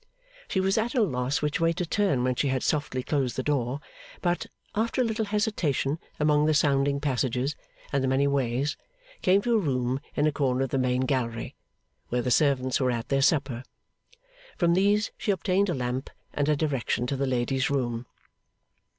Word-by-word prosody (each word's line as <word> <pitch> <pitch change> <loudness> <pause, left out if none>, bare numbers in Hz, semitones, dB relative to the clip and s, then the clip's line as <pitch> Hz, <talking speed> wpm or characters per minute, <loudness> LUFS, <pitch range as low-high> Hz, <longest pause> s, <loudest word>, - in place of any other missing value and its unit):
She 190 - 0
was 195 +3 +2
at 235 +4 -2
a 245 - +4
loss 130 -4 -1
which 150 0 0
way 165 0 +3
to 180 - -2
turn 180 -8 +1
when 130 0 +2
she 140 - 0
had 130 -1 0
softly 140 -4 -1
closed 135 -5 0
the 130 - -2
door; 135 -1 -1 0.4
but, 175 -1 -1 0.3
after 225 +4 -1
a - - +5
little 220 -1 -1
hesitation 180 - 0 0.2
among 150 0 +3
the 155 - +3
sounding 140 -1 +2
passages 130 -1 0 0.4
and 140 -1 +2
the - - +1
many 135 +2 +2
ways, 140 0 0 0.4
came 195 +2 +4
to 240 - +1
a 225 - +4
room 130 -6 0 0.2
in 145 - +2
a 155 - +3
corner 135 -3 +1
of 135 - -3
the 135 - +1
main 125 0 +1
gallery, 125 -4 -1 0.6
where 125 0 0
the 125 - -1
servants 130 -2 +2
were 130 -2 +2
at 120 -1 -2
their 135 0 +2
supper. 135 -4 +2 1.0
From 170 -2 +3
these 205 +3 +2
she - - -3
obtained 195 +1 +2
a 175 - 0
lamp, 125 +1 -3 0.2
and 145 0 0
a 150 - +4
direction 135 -5 -1
to 140 - -1
the 135 0 -1
lady's 130 +1 0
room. 120 -4 -1
140 Hz, 190 wpm, -27 LUFS, 130-165 Hz, 1.0 s, a